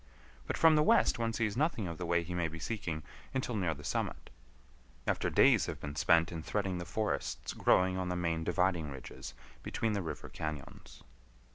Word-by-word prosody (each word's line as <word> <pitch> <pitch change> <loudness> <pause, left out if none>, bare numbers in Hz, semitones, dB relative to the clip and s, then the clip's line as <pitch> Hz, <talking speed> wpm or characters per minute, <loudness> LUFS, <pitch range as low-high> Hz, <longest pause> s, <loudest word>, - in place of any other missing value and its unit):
But - - -2
from 160 -1 +6
the 150 - +5
west 150 - +4
one 115 0 +1
sees 110 -3 -1
nothing 135 - 0
of 85 -1 -6
the 90 - -3
way 85 0 +2
he 85 +2 -6
may 85 -1 0
be 80 +1 -7
seeking 85 -5 -3 0.3
until 125 -3 -1
near 90 -6 0
the 75 - -11
summit, - - -3 0.7
after - - +1
days - - +5
have - - -4
been 75 0 -6
spent 85 +4 +4
in 85 -2 -4
threading 95 0 -1
the 85 - -5
forests 105 +5 -2
growing 95 0 +3
on 90 -1 -2
the 90 - -1
main 85 -2 -1
dividing 90 -2 +1
ridges 70 -2 -8 0.3
between 115 -1 -1
the 100 - 0
river 80 -4 -5
cañons. 75 -3 -7
90 Hz, 190 wpm, -33 LUFS, 80-105 Hz, 0.7 s, from